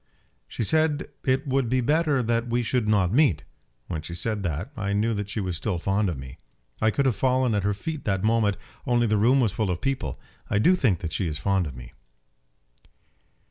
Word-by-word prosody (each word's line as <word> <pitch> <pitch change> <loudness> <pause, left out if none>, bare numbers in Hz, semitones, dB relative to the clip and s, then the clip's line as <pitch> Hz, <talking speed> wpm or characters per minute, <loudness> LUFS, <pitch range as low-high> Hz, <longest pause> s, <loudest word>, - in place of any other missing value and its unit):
"She - - -3
said 155 +4 +2 0.2
it 130 0 +1
would 135 -3 0
be 130 +1 +2
better 145 +1 +2
that 115 +1 0
we 120 +1 0
should 120 -1 0
not 100 -3 +2
meet. 115 - +3 0.4
When 80 +1 -4
she 85 +1 -7
said 105 +4 -2
that, 85 - -3
I 100 -3 -2
knew 110 +3 +1
that 105 -1 -3
she 105 - -3
was 90 -4 -2
still 90 +3 -2
fond 100 +3 0
of 80 - -3
me. 65 -1 -10 0.4
I 110 - +4
could 140 +5 0
have 130 -5 +2
fallen 130 0 +2
at 105 - +1
her 100 +1 0
feet 155 +7 -5
that 95 -3 0
moment, 110 -2 +2 0.3
only 120 -1 +3
the 110 -1 +2
room 125 +6 +4
was 115 -6 +2
full 110 -1 -1
of 90 -1 -1
people. 130 - -2 0.3
I - - +1
do 120 - +5
think 115 - +1
that 80 -2 -4
she 95 - -1
is 75 -2 -3
fond 95 +1 0
of 70 - -8
me." 60 +1 -11
110 Hz, 220 wpm, -25 LUFS, 95-130 Hz, 0.4 s, do